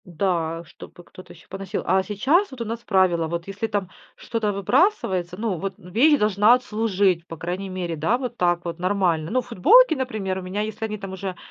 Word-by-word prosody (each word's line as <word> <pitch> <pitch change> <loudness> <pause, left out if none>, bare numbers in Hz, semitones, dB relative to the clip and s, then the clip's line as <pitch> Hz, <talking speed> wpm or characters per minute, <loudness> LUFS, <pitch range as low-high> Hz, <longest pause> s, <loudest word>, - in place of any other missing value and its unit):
Да, 170 -2 -2
чтобы 175 - -14
кто-то 185 - -14
ещё 170 - -18
поносил. 195 -1 -5
А 190 +2 +3
сейчас, 265 - +1
вот 265 - -10
у - - -2
нас 230 +1 -5
правило: 180 -5 +2
вот 170 +1 -4
если 200 +3 -3
там 205 -4 -2 0.3
что-то 225 -3 -2
выбрасывается, 190 - +1
ну, 215 -4 -2
вот, 195 +2 -3
ну, 180 - -14
вещь 290 - +5
должна 210 +2 +4
отслужить, 205 -7 0
по 165 - -8
крайней 180 +4 -4
мере, 180 -3 -4
да, 160 +10 +1
вот 250 -2 -5
так 175 -1 +1
вот 170 0 -5
нормально. 180 -4 0
Ну, 255 +2 +2
футболки, 325 - +5
например, 215 -8 -3
у - - -7
меня, 185 +3 -3
если 215 +1 -4
они 215 0 -5
там 195 -2 -7
уже, 190 -1 -5
195 Hz, 205 wpm, -23 LUFS, 175-220 Hz, 0.3 s, вещь